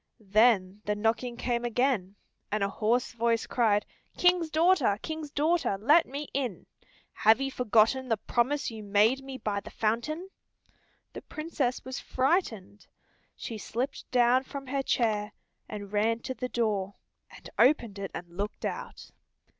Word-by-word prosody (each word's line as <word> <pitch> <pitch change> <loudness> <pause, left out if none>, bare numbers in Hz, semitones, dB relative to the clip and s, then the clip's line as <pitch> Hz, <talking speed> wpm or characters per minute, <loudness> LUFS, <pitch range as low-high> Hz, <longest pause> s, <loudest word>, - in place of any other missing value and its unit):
Then 210 -3 +4
the 210 - 0
knocking 230 +3 -1
came 240 -1 -1
again, 240 -5 0 0.4
and 210 -1 0
a 200 - +1
hoarse 230 +5 0
voice 230 -1 +1
cried, 215 -4 +2 0.3
"King's 355 -2 +3
daughter, 315 - +3
King's 315 -1 -5
daughter, 305 - +1
let 300 - +5
me 280 +3 -5
in. 255 -9 -3 0.5
Have 220 +2 +4
you 270 0 -2
forgotten 250 +2 +2
the 225 - +2
promise 250 +6 0
you 220 -1 -8
made 210 +6 +2
me 270 -1 -7
by 210 -4 -2
the - - -10
fountain?" 270 - -2 0.8
The - - -7
Princess 305 -5 -3
was 260 0 -5
frightened. 250 - -1 0.5
She 225 -2 -6
slipped 250 +7 -4
down 250 0 +4
from 275 0 -7
her 275 +1 -1
chair, 215 -5 0 0.4
and 205 -1 -7
ran 225 +2 +1
to 260 - -4
the 250 +1 -5
door, 205 -5 -1 0.3
and - - -13
opened 235 -6 +3
it 195 -1 -4
and 175 - -6
looked 205 +3 -4
out. - - -6
235 Hz, 150 wpm, -29 LUFS, 210-270 Hz, 0.8 s, let